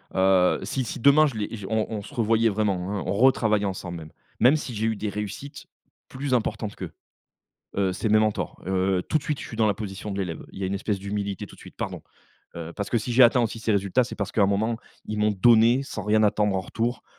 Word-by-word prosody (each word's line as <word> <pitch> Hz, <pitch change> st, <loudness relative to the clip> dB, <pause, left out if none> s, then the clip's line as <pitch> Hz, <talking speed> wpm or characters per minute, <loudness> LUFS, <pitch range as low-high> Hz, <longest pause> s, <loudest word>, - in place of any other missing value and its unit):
heu, 95 Hz, -1 st, +4 dB
si 130 Hz, -, -2 dB
si -, -, -5 dB
demain 140 Hz, +5 st, +6 dB
je 135 Hz, -, -5 dB
les 105 Hz, -1 st, -4 dB
on 110 Hz, -1 st, 0 dB
on 105 Hz, -2 st, -3 dB
se 125 Hz, -, -12 dB
revoyait 115 Hz, -2 st, +2 dB
vraiment, 100 Hz, -3 st, -1 dB
hein, -, -, -4 dB
on 95 Hz, -, -1 dB
retravaillait 110 Hz, -2 st, +3 dB
ensemble. 85 Hz, -4 st, -5 dB, 0.3 s
Même 130 Hz, +5 st, +6 dB
si 135 Hz, -6 st, -4 dB
j'ai 110 Hz, +1 st, -1 dB
eu 110 Hz, 0 st, +1 dB
des 105 Hz, 0 st, -3 dB
réussites, 105 Hz, +7 st, -6 dB, 0.4 s
plus 135 Hz, 0 st, -4 dB
importantes 110 Hz, -3 st, -1 dB
qu'eux, -, -, -7 dB, 0.9 s
heu, 95 Hz, -2 st, +1 dB
c'est 110 Hz, -, -2 dB
mes 110 Hz, +1 st, +5 dB
mentors. 110 Hz, -1 st, -1 dB
Heu, 95 Hz, 0 st, +1 dB
heu, -, -, -2 dB
tout 155 Hz, -, 0 dB
de -, -, -12 dB
suite 150 Hz, -1 st, -2 dB
je -, -, -7 dB
suis 115 Hz, -, -8 dB
dans 110 Hz, -1 st, +3 dB
la 105 Hz, -, +2 dB
position 100 Hz, 0 st, -6 dB
de 100 Hz, -, -4 dB
l'élève, 90 Hz, -4 st, -4 dB
il 95 Hz, -, -7 dB
y -, -, 0 dB
une 95 Hz, -, -2 dB
espèce 100 Hz, +1 st, -2 dB
d'humilité, 100 Hz, 0 st, -4 dB
tout -, -, -15 dB
de -, -, -18 dB
suite, -, -, -13 dB
pardon, -, -, -5 dB, 0.5 s
heu, 85 Hz, 0 st, -7 dB
parce 100 Hz, -, -4 dB
que 120 Hz, -, +2 dB
si 120 Hz, +2 st, -3 dB
j'ai 130 Hz, +2 st, +7 dB
atteint 120 Hz, +1 st, +5 dB
aussi 115 Hz, 0 st, -2 dB
ces 110 Hz, -, 0 dB
résultats 100 Hz, +4 st, +2 dB
c'est 125 Hz, -, -7 dB
parce 100 Hz, -, -3 dB
qu'à 110 Hz, -, +1 dB
un -, -, +6 dB
moment, 110 Hz, +3 st, 0 dB, 0.3 s
ils 105 Hz, -, -4 dB
m'ont 105 Hz, 0 st, +3 dB
donné, 115 Hz, +5 st, +5 dB
sans 105 Hz, -6 st, -6 dB
rien 110 Hz, +2 st, +3 dB
attendre 105 Hz, -1 st, +2 dB
en 95 Hz, -, 0 dB
retour. 120 Hz, +5 st, -3 dB
105 Hz, 250 wpm, -25 LUFS, 100-115 Hz, 0.9 s, j'ai